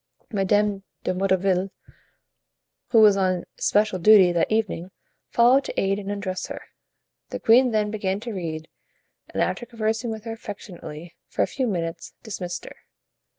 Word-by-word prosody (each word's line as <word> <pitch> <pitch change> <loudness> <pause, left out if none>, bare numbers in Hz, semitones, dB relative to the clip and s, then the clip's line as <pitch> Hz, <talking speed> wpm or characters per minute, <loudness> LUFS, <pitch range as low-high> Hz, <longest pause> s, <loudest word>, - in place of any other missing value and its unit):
Madame 205 0 +1 0.2
de 185 - 0
Motteville, 190 0 +1 1.2
who 230 -2 +5
was 210 -2 +7
on 185 -2 +1 0.2
especial 210 -2 +2
duty 195 -1 +7
that 175 +3 0
evening, 210 -5 -1 0.4
followed 250 +4 +5
to - - -4
aid 195 +1 +1
and 200 -1 -6
undress 200 -2 -3
her. - - -6 0.7
The - - -5
queen 250 +3 +5
then 210 -2 0
began 195 -2 -1
to 235 -1 -5
read, 160 -4 -5 0.6
and - - +1
after 240 - -3
conversing 225 0 -2
with 220 -1 -5
her 225 - -5
affectionately 175 -6 -9
for - - 0
a - - +3
few 260 -2 -2
minutes, 165 -4 -4
dismissed 180 -6 -5
her. - - -11
200 Hz, 150 wpm, -24 LUFS, 185-220 Hz, 1.2 s, was